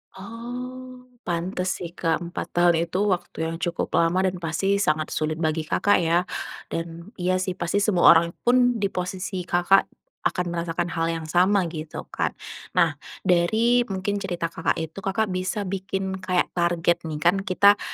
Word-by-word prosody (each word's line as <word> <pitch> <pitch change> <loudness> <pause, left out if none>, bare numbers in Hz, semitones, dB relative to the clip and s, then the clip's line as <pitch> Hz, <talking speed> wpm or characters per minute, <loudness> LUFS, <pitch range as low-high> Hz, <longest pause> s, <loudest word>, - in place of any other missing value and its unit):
Oh 250 +4 -8 0.2
pantes 180 +2 -2 0.2
sih 170 - -6
Kak 170 0 -1
4 170 0 -6
tahun 170 -1 +4
itu 190 +3 0
waktu 180 - -3
yang 165 - -4
cukup 170 -1 -2
lama 170 +3 +2
dan 185 -1 -1
pasti 180 +4 0
sangat 155 -5 0
sulit 155 0 -1
bagi 155 -1 -1
Kakak 205 -2 +3
ya 170 +1 +2 0.5
dan 170 +4 -5
iya 180 +1 +1
sih 185 0 -1
pasti 185 +2 -1
semua 195 -5 +4
orang 170 +1 +3 0.2
pun 245 -1 +4
di 200 - +1
posisi 185 0 -4
Kakak 175 +3 +4 0.4
akan 180 - -2
merasakan 170 0 -2
hal 165 0 0
yang 165 -1 -2
sama 185 +5 +3
gitu 155 -1 -6
kan. - - -1 0.4
Nah, - - +3 0.2
dari 220 +7 +3
mungkin 195 +1 -2
cerita 175 -4 -3
Kakak 165 - 0
itu 160 +3 -5
Kakak 195 +1 -1
bisa 185 +3 -2
bikin 190 0 -3
kayak 185 -1 0
target 175 -1 +1
nih, 155 - -4
kan 175 +5 +2
kita 200 +2 +4
180 Hz, 165 wpm, -24 LUFS, 170-195 Hz, 0.5 s, tahun